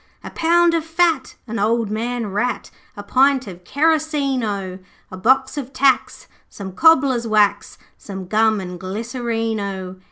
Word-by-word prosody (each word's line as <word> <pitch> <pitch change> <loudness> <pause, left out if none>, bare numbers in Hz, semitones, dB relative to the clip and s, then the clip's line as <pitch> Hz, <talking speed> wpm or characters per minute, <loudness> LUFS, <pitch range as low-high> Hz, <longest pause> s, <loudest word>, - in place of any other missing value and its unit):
'A - - -8
pound 340 +1 +3
of 330 -2 0
fat, 325 -3 0
an 230 -2 -5
old 220 +1 0
man 235 +2 -2
rat, 210 +5 -2 0.3
A - - -7
pint 270 0 +2
of 180 -3 -10
kerosene 295 - 0
O! 195 -3 -4 0.3
A - - -7
box 265 +7 +2
of 270 -1 -8
tacks, 270 0 +1 0.2
some 195 -2 -8
cobbler's 260 - +3
wax, 205 -2 +1 0.2
Some 190 -2 -8
gum 220 +1 +2
and 180 -2 -7
glycerine 225 +3 -3
O! 190 -2 -5
230 Hz, 150 wpm, -20 LUFS, 200-275 Hz, 0.3 s, pound